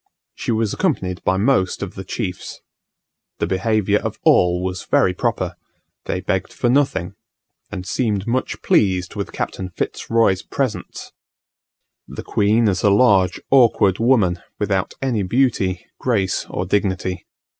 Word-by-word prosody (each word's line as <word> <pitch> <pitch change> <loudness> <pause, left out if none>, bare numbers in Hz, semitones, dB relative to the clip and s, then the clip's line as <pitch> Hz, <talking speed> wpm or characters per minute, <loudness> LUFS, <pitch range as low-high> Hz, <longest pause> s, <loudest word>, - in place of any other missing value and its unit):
She - - -3
was 110 -2 0
accompanied 95 - -1
by 95 - +1
most 100 -3 +1
of - - -6
the - - -7
chiefs. 90 0 -5 0.8
The - - 0
behaviour 105 +3 +1
of - - -4
all 90 0 +4
was 95 0 -4
very 90 - +3
proper: - - -1 0.5
they - - -2
begged - - -2
for 120 - 0
nothing, 125 -11 +1 0.6
and 95 -3 -6
seemed 105 -3 -1
much 125 +2 -2
pleased 95 -3 +2
with 100 -1 -4
Captain 95 -1 -4
Fitz 90 - -5
Roy's 115 -5 +3
presents. 110 -10 -4 1.0
The - - -8
queen 110 +3 +2
is 95 -3 0
a 105 - +4
large 100 -4 +4
awkward 115 -7 +4
woman, 110 -8 +2 0.2
without 100 -3 -1
any 120 -6 0
beauty, 95 -4 0
grace 105 -7 0
or 90 - -3
dignity. 95 -2 -1
100 Hz, 140 wpm, -20 LUFS, 95-115 Hz, 1.0 s, all